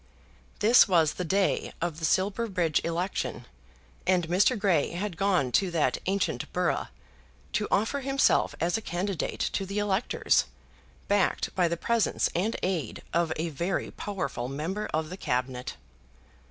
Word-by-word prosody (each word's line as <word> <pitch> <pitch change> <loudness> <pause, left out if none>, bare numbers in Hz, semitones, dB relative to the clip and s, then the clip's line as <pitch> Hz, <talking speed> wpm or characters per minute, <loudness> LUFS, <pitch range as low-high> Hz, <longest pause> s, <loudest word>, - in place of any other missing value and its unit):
This 230 +3 +7
was 165 -5 +3
the 180 - -4
day 190 +3 0
of 165 -2 -3
the 160 - -1
Silverbridge 185 -2 +1
election, 170 +3 -2 0.6
and 180 -3 +3
Mr. 195 +8 +3
Grey 185 -8 +1
had 185 +1 -3
gone 180 -8 +1
to 190 +8 +2
that 155 -7 +1
ancient 195 +1 -1
borough, - - 0 0.7
to 210 - 0
offer 225 +7 +1
himself 275 0 +2
as 175 +5 +1
a - - -11
candidate 185 -1 -3
to 195 - 0
the 200 +2 -5
electors, 205 +2 +2 0.6
backed 200 -2 +1
by 180 -2 +2
the 170 0 -2
presence 230 +4 +1
and 200 +7 0
aid 175 - -2
of 170 -1 +1
a 165 +2 -2
very 170 +5 -2
powerful 190 -11 -4
member 165 +10 -3
of 155 +1 -2
the 185 - -6
Cabinet. 125 -4 -2
185 Hz, 145 wpm, -28 LUFS, 165-200 Hz, 0.7 s, This